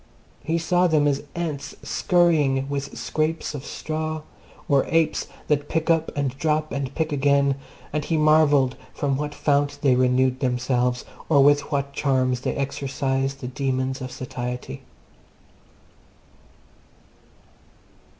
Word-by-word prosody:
He 165 +1 0
saw 175 +2 +2
them 155 -3 +3
as 140 -1 +1
ants 160 -5 -4
scurrying 150 -7 +2
with 140 0 -4
scraps 155 0 -2
of 140 -3 -6
straw, 155 0 -4 0.4
or 140 -2 +4
apes 165 -1 +1 0.2
that 145 -1 0
pick 160 +1 +1
up 165 -1 +1
and 135 -2 -1
drop 155 0 0
and 140 -2 -3
pick 160 -1 -1
again, 140 0 +3 0.4
and 150 0 0
he 160 - 0
marvelled 150 -4 +4 0.2
from 140 -2 0
what 150 +1 -3
fount 145 0 +1
they 135 -3 +5
renewed 130 0 +2
themselves, 125 -1 0 0.2
or 140 -4 +6
with 145 +2 +3
what 140 -1 -1
charms 130 -3 +1
they - - -2
exorcised 135 0 -2
the 125 - -4
demons 130 0 -2
of 130 0 -5
satiety. 125 - -5
140 Hz, 130 wpm, -24 LUFS, 130-155 Hz, 0.4 s, or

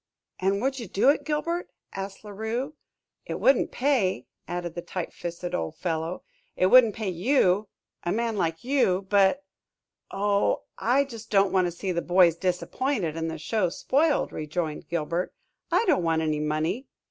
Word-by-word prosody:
"And 195 +3 +1
would 265 0 0
you 230 - -6
do 200 +8 +3
it, 290 - +2
Gilbert?" 335 +3 -2 0.2
asked 195 +1 -6
La 210 - -9
Rue. 225 +8 -3 0.5
"It - - -3
wouldn't - - +3
pay," 240 - +1 0.2
added 175 -1 -4
the 175 - -5
tight 180 0 -5
fisted 175 +1 -5
old 80 -1 -2
fellow. 165 0 -3 0.3
"It - - +2
wouldn't 240 -5 +7
pay 215 -3 -2
you 195 +1 +2 0.3
a 175 - -2
man 230 +2 0
like 165 -4 -1
you; 240 -8 +2
but 200 +7 +4 0.4
" - - -64
"Oh, 200 +1 +1 0.2
I 255 +4 +3
just 230 -5 -10
don't 195 -2 +3
want 185 -2 +3
to - - -3
see 185 +2 -3
the 170 -1 -1
boys 175 -2 +4
disappointed 185 - -1
and 165 0 -2
the 160 - -5
show 185 +4 0
spoiled," 285 - +1
rejoined 155 0 -4
Gilbert. 170 +1 -2 0.4
"I - - +3
don't 345 - +3
want 165 -1 +1
any 155 -1 0
money." 155 - -1
190 Hz, 170 wpm, -26 LUFS, 170-235 Hz, 0.5 s, wouldn't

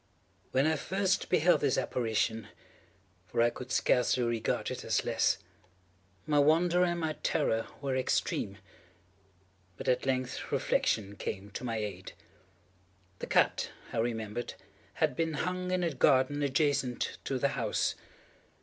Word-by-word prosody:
When 130 +2 +3
I 160 0 +2
first 190 +3 0
beheld 180 0 +4
this 140 -3 +2
apparition—for 110 -5 -4
I 120 0 +4
could 125 +1 -8
scarcely 125 0 +2
regard 115 -2 -1
it - - -5
as - - 0
less—my 95 - -3
wonder 170 +4 +4
and 175 -1 0
my 160 -2 -1
terror 115 0 +1 0.2
were 135 -2 0
extreme. 130 -1 0 1.2
But - - -7
at 130 +1 +1
length 130 -1 -2
reflection 100 -2 0
came 100 +1 -5
to 115 - -6
my 115 -2 -2
aid. 100 -4 -5 1.1
The - - -5
cat, - - +2 0.2
I - - 0
remembered, 115 0 -2 0.4
had - - +1
been 165 +1 0
hung 180 +4 -2
in 185 -1 +1
a 165 -3 0
garden 130 +2 +3
adjacent 140 -3 0
to 135 - -1
the 140 +2 +1
house. 115 -6 0
130 Hz, 130 wpm, -31 LUFS, 110-150 Hz, 1.2 s, beheld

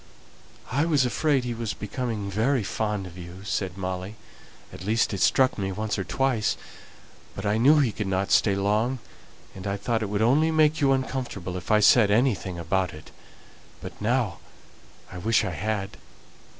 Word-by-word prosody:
"I 140 +5 +2
was 150 -6 +3
afraid 140 +1 +1
he 120 -1 -3
was 115 -2 -4
becoming 105 -2 -4
very 115 +4 +1
fond 105 -1 -2
of 90 0 -10
you," 90 +2 -10
said 95 -3 -3
Molly; 95 +2 -4 0.6
"at - - -9
least 110 +2 +1
it 95 - -3
struck 130 +2 +3
me 95 -1 -2
once 105 +1 -2
or - - -1
twice; 115 +3 0 0.8
but 95 - -6
I 105 +2 +1
knew 145 +6 +6
he 135 -6 +3
could 105 -1 -4
not 95 0 -1
stay 100 -3 +4
long, 105 +6 +1 0.6
and 95 +1 -7
I 100 0 -1
thought 115 +2 -1
it 105 - -2
would 105 +1 0
only 145 +7 +4
make 155 -1 +3
you 140 -1 +4
uncomfortable 130 -9 -2
if 90 -3 -7
I 105 0 +4
said 105 0 +6
anything 105 -5 +1
about 85 0 -1
it. 75 - -13 0.7
But - - -10
now 115 -4 0 0.7
I 90 - -7
wish 110 +3 +2
I 100 - -2
had!" 100 +1 -3
105 Hz, 175 wpm, -26 LUFS, 95-125 Hz, 0.8 s, knew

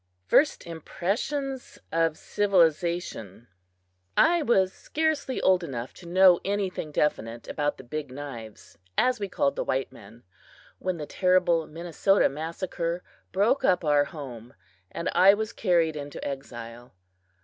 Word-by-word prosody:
FIRST 290 - +3
IMPRESSIONS 220 - -3
OF 165 -1 +1
CIVILIZATION 170 - 0 0.7
I 340 +1 +5
WAS 190 -9 +2
scarcely 310 -4 -1
old 185 -1 +3
enough 125 -6 -5
to 175 - -13
know 180 0 +6
anything 195 -5 -2
definite 115 -6 -1
about 145 -1 -1
the - - -11
"Big 145 +2 -5
Knives," 120 -10 -9 0.2
as 250 -2 +3
we 200 -1 -3
called 140 - 0
the - - -1
white 135 0 -1
men, 110 +4 -15 0.6
when 185 -2 -2
the 150 - -5
terrible 180 -2 +2
Minnesota 175 +4 +1
massacre 170 +3 -4 0.3
broke 210 +8 +2
up 180 -2 +2
our 145 -1 +4
home 130 -5 -9 0.3
and 170 - -5
I 195 +2 +7
was 220 0 -4
carried 170 -5 +2
into 145 -1 -6
exile. 120 -4 -8
170 Hz, 130 wpm, -27 LUFS, 140-190 Hz, 0.7 s, I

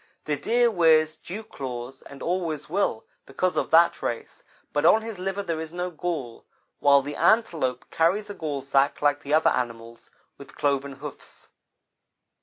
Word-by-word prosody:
The 150 - 0
Deer 235 +8 +2
wears 160 -4 +4
dew 210 +5 -8
claws 125 - -7
and 140 -1 -11
always 170 -4 -2
will, 170 - -1 0.2
because 180 +7 -1
of - - -1
that 165 +1 +5
race, 115 - -4 0.3
but 145 - +1
on 215 +7 +5
his 225 -4 -7
liver 195 +2 -2
there 165 -4 -3
is 160 0 -6
no 180 +1 -3
gall, 155 -8 -4 0.4
while 140 -1 +5
the 145 +2 -5
Antelope 160 - +2
carries 185 +6 +1
a 205 - -6
gallsack 140 -5 0
like 145 0 +2
the 145 +2 +1
other 160 - +4
animals 115 -1 -4 0.3
with 140 - -13
cloven 140 -1 0
hoofs. 140 +1 -11
155 Hz, 160 wpm, -25 LUFS, 140-180 Hz, 0.4 s, that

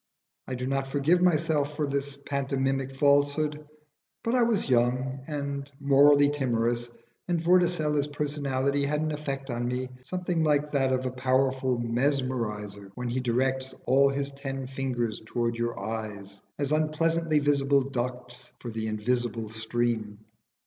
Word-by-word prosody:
I 130 - -3
do 125 +1 -4
not 135 0 -1
forgive 145 +6 +2
myself 155 -4 +2
for 150 - 0
this 140 0 -3
pantomimic 135 -1 -1
falsehood, 145 +2 +2 0.6
but 230 0 0
I 255 - +4
was 230 -4 +2
young 125 +1 +1
and 140 -2 -4
morally 145 +1 +6
timorous, 120 -4 0 0.4
and 175 -2 +1
Vorticella's 165 -4 +2
personality 140 -2 -1
had 150 +1 0
an 155 0 -1
effect 140 -3 -4
on 120 0 -2
me 125 +1 -2
something 175 +2 -1
like 150 -1 +2
that 135 -2 +2
of 130 0 0
a 130 - -1
powerful 130 0 +1
mesmeriser 115 -5 -1
when 125 -1 -3
he 125 +2 -1
directs 130 +2 0
all 135 +2 +5
his 140 0 -2
ten 135 -1 -5
fingers 125 -4 -2
towards 115 +1 -2
your 120 0 -2
eyes, 100 -2 -6 0.2
as 145 0 -2
unpleasantly 155 +1 +1
visible 140 -1 +3
ducts 125 -1 -5
for 120 - -6
the 110 0 -3
invisible 115 0 -1
stream. 110 -1 -2
135 Hz, 140 wpm, -28 LUFS, 120-145 Hz, 0.6 s, morally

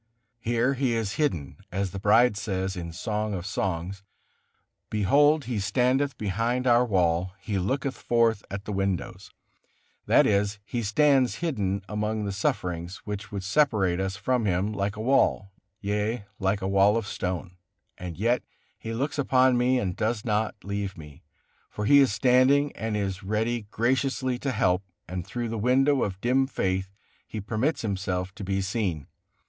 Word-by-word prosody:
Here 120 +3 +1
He 130 -2 0
is 110 -3 -2
hidden, 85 - -1
as 95 0 -2
the 95 - -5
bride 110 +3 +4
says 95 -2 -2
in 85 -2 -5
the 85 - -9
Song 105 0 -2
of 90 -1 -5
Songs: 95 -1 -3 0.9
"Behold 145 +8 +3
he 115 -3 -2
standeth 125 +7 +1
behind 115 +5 -1
our 120 -1 +5
wall, 90 -4 +1
he 100 0 -2
looketh 135 +8 -1
forth 115 -3 +2
at 100 0 -6
the - - -4
windows"; 95 -2 -2 0.8
that - - +5
is, 100 0 +1
He 120 +3 -3
stands 130 +4 +3
hidden 100 - -2
among 105 0 -2
the 100 - -2
sufferings, 95 - -2
which 105 +1 -5
would 100 -2 -4
separate 100 -6 +2
us 95 0 -2
from 125 +1 0
Him 95 +2 0
like 100 0 -2
a 105 - -5
wall, 110 -5 +2 0.3
yea, 105 +2 -1
like 95 0 0
a - - 0
wall 100 +2 +4
of 115 - -2
stone, 90 -2 -4 0.4
and 90 -2 -7
yet 120 +5 +1 0.4
He 115 - -5
looks 145 +7 -2
upon 130 -2 +4
me 125 +1 +3
and 95 -7 -1
does 110 0 -1
not 110 -1 0
leave 100 -1 -4
me, 75 -2 -12 0.5
for 105 - -4
He 140 +6 +7
is 135 -5 +4
standing 130 +5 +4
and 110 -1 -2
is 95 -2 -2
ready 110 +2 -1
graciously 130 +2 0
to 140 - -1
help, 90 -6 +2 0.3
and 90 0 -5
through 120 +3 -3
the 115 -1 -3
window 135 +4 +3
of 95 -2 -2
dim 130 +2 +2
faith 95 -6 -1 0.4
He 110 - -5
permits 110 +10 -1
Himself 95 -3 -2
to 105 - -8
be 95 0 -1
seen. 95 -7 -2
105 Hz, 165 wpm, -26 LUFS, 95-125 Hz, 0.9 s, He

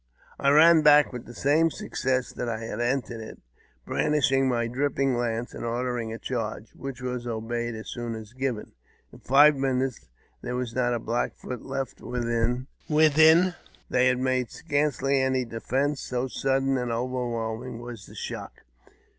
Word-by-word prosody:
I 140 - +3
ran 160 +3 +7
back 150 -2 +6
with 125 -1 -7
the 120 - -10
same 155 +4 +3
success 130 -3 -2
that 120 - -3
I 115 - -2
had 115 - -5
entered 120 -2 -1
it, 110 - -9 0.5
brandishing 135 -3 +2
my 120 -2 +1
dripping 135 +2 0
lance, 120 0 -2
and - - -7
ordered 120 0 -2
a 115 - -5
charge, 115 -3 -4
which 135 -2 -7
was 125 -1 -3
obeyed 120 +1 -3
as 110 - -8
soon 120 -2 -4
as 110 +1 -9
given. 130 -4 -3 0.4
In - - -13
five 145 +3 +6
minutes 130 - -1 0.3
there 125 - -4
was 125 -2 -3
not 120 -1 +1
a - - -2
Black 115 +2 -2
Foot 125 - -7
left 135 -2 -4
within 120 +1 -1 0.2
alive. 160 +3 +5 0.4
They 125 0 +4
made 130 -1 0
scarcely 145 -3 0
any 130 -1 +1
defence, 130 +5 -1
so 125 +1 -2
sudden 135 0 0
and 125 -1 -2
overwhelming 120 -1 -3
was 120 -5 -9
the - - -14
shock. - - -7
125 Hz, 160 wpm, -26 LUFS, 120-135 Hz, 0.5 s, ran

